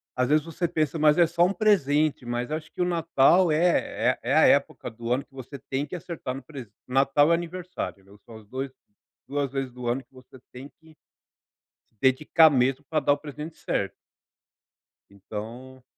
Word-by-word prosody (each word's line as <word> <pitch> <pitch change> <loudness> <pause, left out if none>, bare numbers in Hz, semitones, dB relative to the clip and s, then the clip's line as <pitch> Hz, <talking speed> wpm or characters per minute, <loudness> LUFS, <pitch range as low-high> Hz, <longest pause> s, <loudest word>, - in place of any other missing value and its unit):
Às 125 0 +1
vezes, 150 0 +3
você 165 +1 -2
pensa: 160 -1 -1
"Mas 150 0 +4
é 175 - +6
só 170 +1 +3
um 185 - 0
presente", 155 - +2
mas 120 +3 -3
acho 155 0 -5
que - - -5
o 180 - +3
Natal 170 0 +3
é 170 +3 +1
é - - -3
é - - +3
a - - +6
época - - +1
do 115 +1 -6
ano 135 +3 -2
que 140 - -35
você 135 +1 -9
tem 135 +3 -3
que 150 - -7
acertar 160 -7 -6
no 135 - -8
pres 135 -8 -10 0.2
Natal 135 +4 +3
e - - +6
aniversário, 175 - -4
né. 100 - -21
São 115 - -13
os 110 - -16
dois 130 +4 -5 0.6
duas 140 -1 -2
vezes 135 -2 -3
do 125 -1 -7
ano 125 +3 -1
que 125 - -39
você 130 0 -16
tem 130 +3 -9
que 160 -1 -19 1.1
dedicar 150 +4 +5
mesmo 135 +1 +1
pra 155 -1 +1
dar 145 - +3
o - - -3
presidente 150 +2 -9
certo. 100 - -2 1.1
Então 115 +6 -9
140 Hz, 190 wpm, -26 LUFS, 130-160 Hz, 1.1 s, é